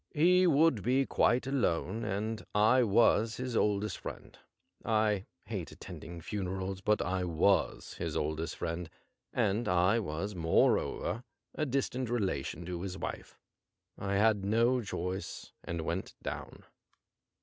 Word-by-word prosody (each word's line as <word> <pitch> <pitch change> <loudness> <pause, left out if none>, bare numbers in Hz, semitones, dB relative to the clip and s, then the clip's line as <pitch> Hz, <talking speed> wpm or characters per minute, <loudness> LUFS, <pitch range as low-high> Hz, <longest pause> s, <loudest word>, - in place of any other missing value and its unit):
He 180 +4 +5
would 155 -7 +4
be 130 +6 +2
quite 125 0 +2
alone, 115 -5 0
and 110 +3 -2
I 110 +5 +5
was 110 0 +3
his 125 -1 -3
oldest 105 0 +1
friend. - - -8 0.5
I 110 -3 +1 0.2
hate - - -5
attending 85 0 -9
funerals, 95 0 -3
but 105 +2 +2
I 95 +1 0
ivas 90 +2 +1
his - - -2
oldest 80 +1 -2
friend, 85 -1 -4 0.4
and 110 0 +1
I 90 +5 +3
was, 100 +1 -3
moreover, 90 +6 +1 0.3
a 155 - -1
distant 130 -2 -1
rela 95 - 0
tion 85 +5 -6
of 90 -1 -4
his 95 0 -4
wife. - - -6 0.6
I 100 0 -2
had 105 -1 +3
no 115 +5 +3
choice 95 -2 -5
and 85 -1 -3
I - - -5
went 85 +4 -3
down. - - -6
105 Hz, 140 wpm, -32 LUFS, 90-120 Hz, 0.6 s, He